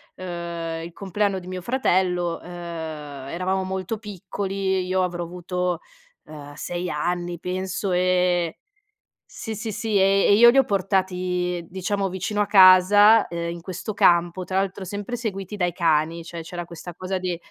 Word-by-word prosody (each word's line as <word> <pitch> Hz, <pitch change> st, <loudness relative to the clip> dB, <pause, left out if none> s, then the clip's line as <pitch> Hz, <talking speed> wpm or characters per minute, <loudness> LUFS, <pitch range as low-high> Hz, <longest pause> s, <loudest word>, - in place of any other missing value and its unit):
uhm, 170 Hz, -2 st, -5 dB
i 170 Hz, -, -7 dB
compleanno 200 Hz, 0 st, -1 dB
di 180 Hz, -, -12 dB
mio 185 Hz, -1 st, -5 dB
fratello, 180 Hz, -7 st, +1 dB
uhm, -, -, -15 dB
eravamo 170 Hz, +1 st, -4 dB
molto 190 Hz, +3 st, -3 dB
piccoli, 195 Hz, -1 st, -3 dB
e -, -, +1 dB
io 185 Hz, +1 st, 0 dB
avrò 175 Hz, -1 st, -2 dB
avuto, 180 Hz, 0 st, -3 dB, 0.5 s
uhm, 145 Hz, -2 st, -10 dB
6 175 Hz, +3 st, -4 dB
anni, 175 Hz, +2 st, -2 dB
penso 185 Hz, +1 st, -3 dB
e 180 Hz, -, +2 dB
e 180 Hz, -1 st, +2 dB
e -, -, -30 dB, 0.7 s
sì, 220 Hz, -2 st, -7 dB
sì, 220 Hz, 0 st, -4 dB
sì, 215 Hz, 0 st, -2 dB
e 195 Hz, +1 st, +4 dB
e 200 Hz, -, +6 dB
io 235 Hz, +3 st, +8 dB
li 270 Hz, -, +3 dB
ho 265 Hz, -, +6 dB
portati, 180 Hz, -3 st, -1 dB
diciamo, 195 Hz, +2 st, -2 dB
vicino 190 Hz, +3 st, -3 dB
a 205 Hz, -, +2 dB
casa, 205 Hz, +3 st, +7 dB
ehm, 170 Hz, 0 st, -4 dB
in 170 Hz, 0 st, -6 dB
questo 185 Hz, +3 st, -5 dB
campo, 175 Hz, -2 st, +3 dB
tra 190 Hz, +1 st, -1 dB
l'altro 195 Hz, 0 st, -2 dB
sempre 205 Hz, +6 st, -5 dB
seguiti 205 Hz, -3 st, -5 dB
dai 175 Hz, -3 st, 0 dB
cani, 165 Hz, 0 st, +1 dB
cioè 165 Hz, 0 st, -7 dB
c'era 175 Hz, +1 st, -6 dB
questa 170 Hz, +1 st, -9 dB
cosa 185 Hz, +1 st, -3 dB
di, 180 Hz, -2 st, -2 dB
185 Hz, 170 wpm, -24 LUFS, 175-195 Hz, 0.7 s, io